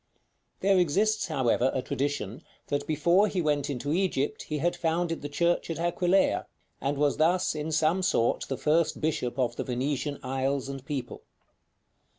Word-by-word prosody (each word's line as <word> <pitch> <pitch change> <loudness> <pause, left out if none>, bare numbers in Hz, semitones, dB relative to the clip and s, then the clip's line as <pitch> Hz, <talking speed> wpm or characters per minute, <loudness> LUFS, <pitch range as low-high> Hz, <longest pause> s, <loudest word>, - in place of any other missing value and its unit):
There 195 -1 +4
exists, 200 +7 +2
however, 130 -4 +2
a 130 - -1
tradition 135 -5 -3 0.3
that 145 0 -1
before 170 +6 +3
he 195 - -2
went 145 -3 0
into 145 +2 -2
Egypt 185 0 0
he 150 - -4
had 175 +4 0
founded 165 0 -1
the 145 - -5
Church 170 +4 +1
at 165 - -3
Aquileia, 175 +3 +2 0.3
and 140 +2 -1
was 145 0 +2
thus, 170 +4 +2
in 155 +1 -4
some 160 +4 +2
sort, 180 -11 +1
the 135 - -3
first 160 +1 +1
bishop 145 -6 -1
of 120 -2 0
the - - -1
Venetian 140 +3 -2
isles 135 +1 -1
and 135 -1 -6
people. 140 -2 -5
150 Hz, 165 wpm, -28 LUFS, 135-175 Hz, 0.3 s, There